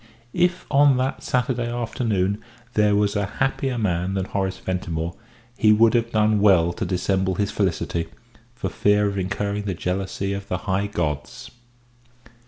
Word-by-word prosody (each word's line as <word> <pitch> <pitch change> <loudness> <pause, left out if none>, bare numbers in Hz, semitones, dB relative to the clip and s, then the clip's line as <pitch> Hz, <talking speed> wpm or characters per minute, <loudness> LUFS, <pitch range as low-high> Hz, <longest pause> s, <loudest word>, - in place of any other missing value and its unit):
If 180 0 +1
on 140 -2 +5
that 130 +1 -1
Saturday 125 -1 -1
afternoon 110 -4 -1 0.3
there 105 -1 +3
was 105 0 +1
a 100 -1 0
happier 135 -1 0
man 95 -3 0
than 95 -1 -1
Horace 95 -1 -2
Ventimore, 85 -2 -3 0.4
he 110 - +5
would 110 +1 +5
have 115 -1 +1
done 110 -1 +3
well 90 -4 +4
to - - -3
dissemble 95 0 0
his 100 +2 -1
felicity, 85 -3 -1 0.5
for 125 - -3
fear 105 0 +2
of 100 -1 -1
incurring 100 +2 -2
the 95 -3 -2
jealousy 95 +2 -2
of 100 0 -5
the 90 - -1
high 100 0 0
gods. 85 - -4
100 Hz, 155 wpm, -23 LUFS, 95-115 Hz, 0.5 s, on